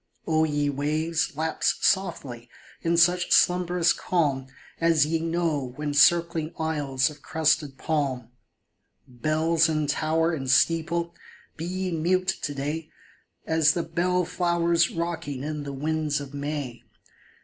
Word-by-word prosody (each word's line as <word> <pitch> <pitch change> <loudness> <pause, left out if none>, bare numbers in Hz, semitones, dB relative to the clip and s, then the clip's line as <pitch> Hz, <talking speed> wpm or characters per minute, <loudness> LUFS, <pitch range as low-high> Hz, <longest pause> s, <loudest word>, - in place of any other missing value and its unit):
O 160 -1 +2
ye 145 -1 0
waves, 155 +3 -1
lapse 160 +2 0
softly, 125 -11 -1 0.3
in 170 0 +1
such 180 +2 +3
slumberous 180 -1 +3
calm 140 -7 -1 0.3
As 165 -3 +3
ye 160 +2 -1
know 165 -6 -1
when 150 +1 -3
circling 165 +1 +3
isles 145 -3 0
of 150 -1 -15
crested 150 -3 0
palm! 130 -7 -2 0.8
Bells 155 +5 +1
in 155 -1 0
tower 160 +3 0
and 135 -4 -4
steeple, 170 +4 +2 0.4
be 165 - -6
ye 185 +1 -3
mute 185 +3 0
to 145 - -3
day 150 +3 -4 0.6
As 160 -2 +3
the 170 - -2
bell 180 +2 0
flowers 170 -1 +1
rocking 165 -5 -4
in 150 -1 -4
the 140 - -5
winds 150 +1 -1
of 140 -1 -9
May 140 -4 -4
160 Hz, 130 wpm, -25 LUFS, 145-170 Hz, 0.8 s, such